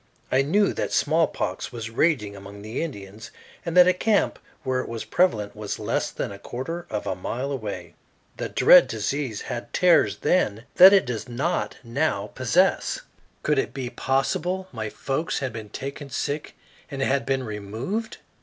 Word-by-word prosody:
I 130 - +4
knew 195 +9 +2
that - - -2
smallpox 160 +1 0
was 115 -2 -6
raging 115 -6 +1
among 100 +1 -10
the 110 +3 -4
Indians, 105 -9 -7 0.3
and 170 +1 -2
that 180 0 +9
a 185 - +5
camp 210 +3 +1 0.2
where 130 -1 0
it - - -8
was 115 -1 -5
prevalent 105 - +1
was 105 -1 -4
less - - -1
than - - -4
a 100 - -9
quarter 165 +11 -5
of 105 -1 -3
a - - -1
mile 125 +9 -4
away. 100 -10 -5 0.4
The - - -3
dread - - +7
disease 115 +1 -2
had 120 - -6
terrors 180 -1 +4
then 110 - +1
that 185 +2 +11
it 195 -1 +5
does 120 -1 -4
not 140 +9 -1
now 115 -1 -1
possess. - - +2 0.4
Could 150 -2 +2
it - - -2
be 130 -3 -4
possible 155 +9 -1
my 110 -3 -4
folks 135 +8 -2
had 130 -4 -3
been 110 -2 -7
taken 140 +4 -6
sick 145 +3 -3 0.3
and 135 -1 -3
had 135 0 +1
been 135 -1 0
removed? 115 - -4
130 Hz, 170 wpm, -25 LUFS, 110-160 Hz, 0.4 s, that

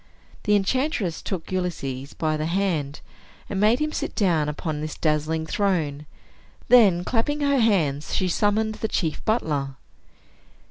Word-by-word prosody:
The 210 - +4
enchantress 205 - 0
took 185 -3 -5
Ulysses 140 -7 -3
by 155 -1 0
the 155 +1 -2
hand, 170 -6 -1 0.5
and 195 - -3
made 215 +4 +4
him 305 +2 -1
sit - - -4
down 165 -7 +2
upon 150 0 -4
this 155 0 -5
dazzling 155 +1 0
throne. 160 -6 -1 0.6
Then, 200 -8 +6
clapping 260 +8 -1
her 280 -1 +2
hands, 160 - +1
she 185 - +1
summoned 215 +4 +1
the 220 - +1
chief 165 -7 -2
butler. 150 - 0
180 Hz, 140 wpm, -24 LUFS, 155-215 Hz, 0.6 s, Then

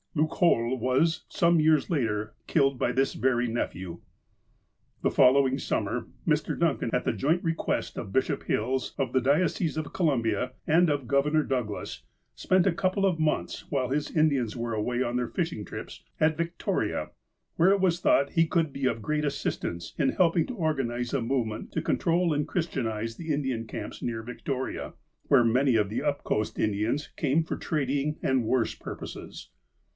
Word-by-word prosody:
Loocoal 150 -5 +2
was, 130 +7 +1
some 170 0 +3
years 155 -1 +3
later, 110 -8 -1
killed 135 -4 +2
by - - +1
this 135 +1 +1
very 125 -2 +1
nephew. 95 -7 -4 1.0
The - - +2
following 135 +1 +5
summer, - - -2 0.2
Mr. - - +1
Duncan, - - +1
at - - 0
the - - +1
joint 160 +6 +1
re 165 - +1
quest - - -2
of 95 - -5
Bishop 130 - 0
Hills, 130 +4 -1
of 130 -3 -1
the 130 - +3
Diocese 155 +4 +1
of 155 -2 -4
Columbia, 125 - 0
and 165 +2 +4
of 140 -4 -1
Governor 150 +4 +2
Douglas, 125 -7 -3 0.3
spent 185 -1 +2
a 185 - +3
couple 185 +2 +1
of 180 -4 +1
months, 155 -1 -1
while 130 -4 0
his 145 +2 -1
Indians 140 -8 +1
were 115 0 -3
away 120 +4 0
on 120 0 -2
their 125 -1 -1
fishing 165 - -2
trips, - - -8 0.2
at 155 0 +3
Victoria, 170 +2 -2 0.4
where 170 +3 +4
it 200 - +3
was 180 -3 +2
thought 140 -4 +3
he 165 -2 +3
could 160 -4 0
be 135 -1 0
of 115 -3 -2
great 150 +5 0
assistance 85 - -3
in 135 - +3
helping 170 -2 +2
to 255 - -5
organize 135 - -1
a 140 - +1
movement 115 -3 -2
to - - 0
control 170 0 +1
and 145 0 -1
Christian 160 -9 -1
ize 110 +1 -3
the 165 -2 -5
Indian 130 -6 -1
camps - - -7
near 115 -2 -3
Victoria, 130 +2 -4 0.4
where 130 -4 +6
many 125 +2 +3
of 105 -3 +2
the 115 +5 -2
up 145 -1 -1
coast 105 0 -1
Indians 110 +7 0
came 150 +2 +1
for - - -4
trading 145 0 -1
and 130 -2 +2
worse 115 +1 +1
purposes. - - -8
135 Hz, 175 wpm, -27 LUFS, 120-160 Hz, 1.0 s, where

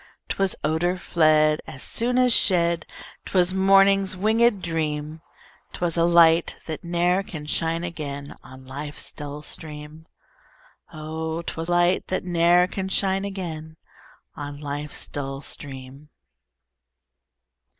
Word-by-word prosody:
'Twas 195 -1 0
odor 165 +4 0
fled 155 -3 +3
As 130 - -8
soon 245 +2 0
as 250 -1 +5
shed; 170 -3 +3 0.4
'Twas 185 -1 +2
morning's 195 0 +4
winged 220 +1 +2
dream; 155 -2 -3 0.5
'Twas 175 -2 -2
a 170 -1 +3
light, 170 -1 +4
that 160 -2 -6
ne'er 175 +2 +1
can 180 -8 -8
shine 165 +2 -1
again 145 -5 -6
On 130 0 -13
life's 145 +3 -6
dull 150 0 -7
stream: 150 +1 -7 0.8
Oh! 160 +1 -5
'twas 165 0 -4
light 175 +1 +2
that 185 - -2
ne'er 175 0 +4
can 190 +1 -4
shine 195 0 0
again 160 -5 -6 0.6
On 145 0 -7
life's 145 0 -5
dull 135 0 -5
stream. 135 +1 -7
165 Hz, 120 wpm, -24 LUFS, 150-185 Hz, 0.8 s, as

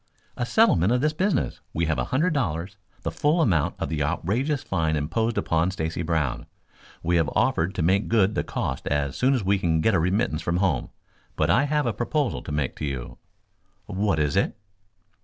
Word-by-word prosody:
"A 120 - -2
settlement 110 - +4
of 125 - +3
this 150 +1 +1
business. 185 -2 0 0.2
We 85 - +1
have 80 0 0
a - - 0
hundred 155 +7 +1
dollars, 95 - -2 0.3
the - - -2
full 150 +4 +1
amount 95 - +2
of - - -3
the 80 -2 -2
outrageous 120 - -1
fine 80 -4 0
imposed 100 +11 -1
upon 80 +2 +1
Stacy 80 -3 -3
Brown. 80 -6 -1 0.6
We 85 +1 +2
have 80 -3 +2
offered 85 +4 +1
to 85 - -1
make 95 +5 +2
good 105 -3 +3
the - - -1
costs - - -3
as 70 -2 0
soon 135 +2 +3
as 120 - -1
we 100 +1 +2
can 80 -3 +1
get 110 +7 +2
a 95 - +3
remittance 90 0 0
from 85 +2 -1
home. 90 -9 0 0.5
But - - +2
I 140 - +4
have 150 -1 +1
a 120 - 0
proposal 130 +4 -1
to - - -7
make 75 -3 -1
to - - -3
you." 65 -4 -5 0.7
"What 100 -3 0
is 75 +2 +1
it?" 95 - +1
95 Hz, 200 wpm, -25 LUFS, 80-120 Hz, 0.7 s, settlement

